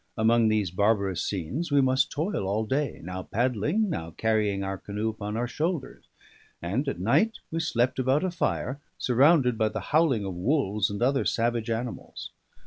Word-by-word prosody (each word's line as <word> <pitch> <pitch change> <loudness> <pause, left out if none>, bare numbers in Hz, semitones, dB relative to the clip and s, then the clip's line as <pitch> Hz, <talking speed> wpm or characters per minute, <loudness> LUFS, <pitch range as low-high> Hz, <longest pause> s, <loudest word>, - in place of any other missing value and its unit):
Among 115 +1 +4
these 105 -4 +1
barbarous 100 -1 +1
scenes 105 - -3
we 145 - +4
must 130 0 +3
toil 155 - -2
all 105 +3 0
day, 140 +5 -2
now 90 +2 -5
paddling, 125 - 0
now 85 - -3
carrying 105 -3 +1
our 95 -1 -4
canoe 105 +2 -3
upon 105 0 -5
our 120 +1 -1
shoulders; 150 +2 -3 0.5
and 105 +12 -2
at 135 - -2
night 165 - +2
we 165 - -1
slept 125 -4 0
about 130 +5 +2
a 185 - 0
fire, 140 -5 -2 0.2
surrounded 130 -1 +3
by 110 -1 +3
the - - -4
howling 145 -10 +3
of 95 - -4
wolves 105 - 0
and 100 +3 -3
other 135 +2 +2
savage 115 0 0
animals. 115 +1 -5
115 Hz, 170 wpm, -27 LUFS, 105-140 Hz, 0.5 s, Among